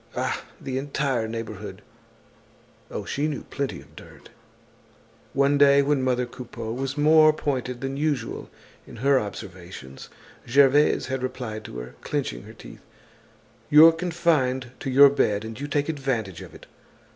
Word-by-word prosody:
Ah, - - -2 0.2
the 130 -1 -3
entire 135 -4 -1
neighborhood. 110 -2 -7 1.1
Oh, - - -5
she 145 +2 -1
knew 150 -3 -4
plenty 140 - -3
of 75 +1 -20
dirt. - - -14 1.0
One 140 +1 +2
day 140 0 +6
when 140 -1 +1
mother 125 -1 +1
Coupeau 120 -2 -7
was 135 +3 -4
more 155 +1 +6
pointed 130 -5 -3
than 135 0 -3
usual 145 -5 -2 0.4
in - - -11
her 135 +3 +3
observations, 90 - -9 0.4
Gervaise 140 +3 +4
had 130 -1 -3
replied 125 -4 -5
to 60 - -8
her, - - -8
clinching - - -3
her - - -12
teeth: - - -13 0.9
"You're 155 +3 +9
confined 160 -7 0
to - - -4
your 140 +2 +7
bed 110 -7 0
and 110 +1 -8
you 145 - -4
take 145 0 0
advantage 125 - -3
of 90 -4 -11
it. - - -13
130 Hz, 145 wpm, -25 LUFS, 115-145 Hz, 1.1 s, You're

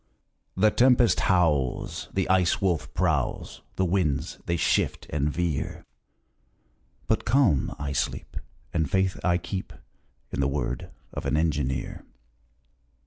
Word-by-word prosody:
The 105 +3 +5
tempest 125 0 +4
howls, 80 - +1
The 95 -1 0
Ice 90 -2 +3
Wolf 90 -5 0
prowls, 80 -8 -1
The 95 - +1
winds 85 -7 0
they 85 - +1
shift - - +1
and 75 0 +1
veer, 80 -3 -2 1.2
But - - +1
calm 115 - +2
I 70 -1 -3
sleep, 70 - -3 0.4
And 80 -3 0
faith 95 -1 +1
I 90 -1 +3
keep 95 +2 -5 0.6
In - - -4
the 70 - +2
word 70 -3 -3 0.2
of - - -4
an 70 +3 +1
engineer. 75 -6 -1
85 Hz, 125 wpm, -26 LUFS, 70-95 Hz, 1.2 s, The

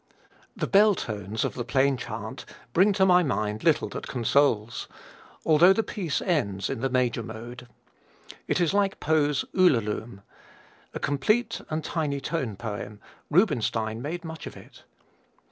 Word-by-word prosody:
The - - -2
"bell 205 +1 +5
tones" 105 - -3
of - - -2
the 120 - -4
plain 135 +3 +2
chant 125 - -6 0.3
bring 190 +4 +5
to 190 -1 +3
my 180 -1 +6
mind 110 -8 -2
little 160 -3 +3
that - - -6
consoles, 120 -2 +1 0.6
although 165 +4 +6
the 225 - 0
piece 175 -10 -3
ends 100 - -1
in - - -3
the 135 - 0
major 125 -2 +1
mode. 120 +2 -9 0.8
It - - +1
is 175 -1 +2
like 200 -1 +1
Poe's 150 -2 +1
"Ulalume." 115 - +1 0.7
A - - -3
complete 215 - 0
and 155 0 -2
tiny 150 -3 -2
tone 135 -7 -3
poem, 105 0 -6 0.3
Rubinstein 115 - +1
made 165 +5 -5
much 160 0 -7
of - - -9
it. - - -16
140 Hz, 145 wpm, -26 LUFS, 115-175 Hz, 0.8 s, my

